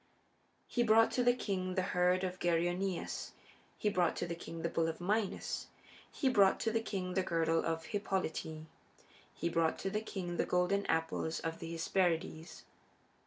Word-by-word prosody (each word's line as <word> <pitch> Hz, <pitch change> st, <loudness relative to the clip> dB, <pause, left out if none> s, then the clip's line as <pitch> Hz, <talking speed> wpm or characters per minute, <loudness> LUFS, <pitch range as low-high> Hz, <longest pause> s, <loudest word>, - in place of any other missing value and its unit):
He 240 Hz, -, 0 dB
brought 225 Hz, -1 st, +5 dB
to 250 Hz, -, +1 dB
the 245 Hz, 0 st, +4 dB
king 185 Hz, -6 st, -2 dB
the 185 Hz, -, +1 dB
herd 180 Hz, 0 st, +2 dB
of 185 Hz, 0 st, -3 dB
Geryoneus; 175 Hz, +2 st, -1 dB, 0.4 s
he -, -, -1 dB
brought 180 Hz, -4 st, +2 dB
to -, -, -2 dB
the 170 Hz, -, -3 dB
king 165 Hz, -1 st, -7 dB
the 170 Hz, -, +1 dB
bull 165 Hz, 0 st, +1 dB
of 160 Hz, -, -3 dB
Minos; 200 Hz, +3 st, -1 dB, 0.4 s
he 275 Hz, -, -1 dB
brought 200 Hz, -7 st, +5 dB
to 225 Hz, -, +1 dB
the 225 Hz, 0 st, +1 dB
king 185 Hz, -5 st, -3 dB
the 190 Hz, -, +2 dB
girdle 165 Hz, -2 st, +1 dB
of 165 Hz, 0 st, -2 dB
Hippolyte; 185 Hz, -6 st, -2 dB, 0.7 s
he -, -, -1 dB
brought 165 Hz, -1 st, +1 dB
to 195 Hz, -, -3 dB
the 215 Hz, +1 st, -1 dB
king 180 Hz, -5 st, -4 dB
the -, -, +2 dB
golden 180 Hz, +3 st, +1 dB
apples 160 Hz, 0 st, 0 dB
of 165 Hz, 0 st, -3 dB
the 165 Hz, 0 st, -6 dB
Hesperides. 165 Hz, -1 st, -1 dB
180 Hz, 170 wpm, -34 LUFS, 165-200 Hz, 0.7 s, brought